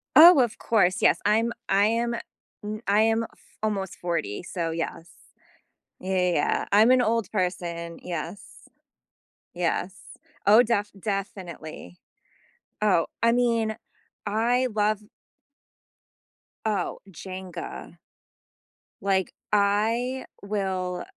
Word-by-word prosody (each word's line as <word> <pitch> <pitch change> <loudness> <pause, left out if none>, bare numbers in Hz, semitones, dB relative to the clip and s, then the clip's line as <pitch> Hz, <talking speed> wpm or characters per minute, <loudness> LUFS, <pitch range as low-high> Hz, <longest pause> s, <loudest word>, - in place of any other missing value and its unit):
Oh, 335 -1 +10
of 240 -2 +1
course, 190 -5 +2
yes, - - +4
I'm 225 +3 +3 0.2
I 200 +1 +4
am, 235 +2 +1 0.5
n 215 +1 -5
I 205 +2 +4
am 225 +1 +2
f - - -15
almost 195 -4 -2
40, 170 - -3
so 170 -2 -3
yes. 165 0 -4 0.9
Yeah, 190 0 -2
yeah, 180 -1 +2
yeah. 145 - +1
I'm 220 +4 +6
an 255 0 +6
old 230 -1 0
person. 175 -3 -3
Yes. 175 +3 -7 0.9
Yes. 180 +2 -1 0.5
Oh, 215 +4 +8
def 210 -3 0
definitely. 185 - -6 0.8
Oh, 200 -6 +3 0.2
I 230 0 +5
mean, 230 -3 +1 0.5
I 240 +5 +2
love 210 0 +1 1.7
Oh, 205 -5 -1
Jenga. 185 0 -8 1.0
Like, 190 -2 0 0.2
I 220 +6 +1 0.2
will 190 -3 -2
205 Hz, 105 wpm, -26 LUFS, 180-225 Hz, 1.7 s, Oh